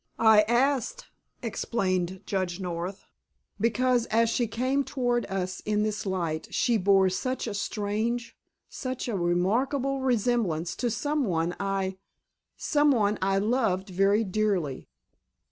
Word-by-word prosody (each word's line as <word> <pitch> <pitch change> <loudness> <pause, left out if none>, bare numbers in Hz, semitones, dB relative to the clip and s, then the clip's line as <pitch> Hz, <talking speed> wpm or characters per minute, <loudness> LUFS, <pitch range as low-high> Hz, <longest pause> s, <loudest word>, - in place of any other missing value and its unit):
"I 220 -2 +6
asked"—explained 235 - -1
Judge 185 -2 -2
North,—"because 210 +7 -2
as 230 +1 +2
she 240 -1 +1
came 255 +5 0
toward 245 -3 -1
us 185 -1 -3
in 210 0 0
this 215 -1 -2
light 170 -4 -2
she 235 -2 +2
bore 195 -1 +4
such 255 +8 -2
a 220 - -3
strange, 215 +4 -2 0.3
such 255 -2 -5
a 235 - -2
remarkable 235 +11 +1
resemblance 230 -10 0
to 245 - 0
some 290 +6 -1
one 170 -2 -1
I—some 195 - -2
one 215 -6 +2
I 195 +1 +2
loved 205 -3 0
very 195 +4 +3
dearly." 190 -8 -1
210 Hz, 115 wpm, -27 LUFS, 190-245 Hz, 0.3 s, I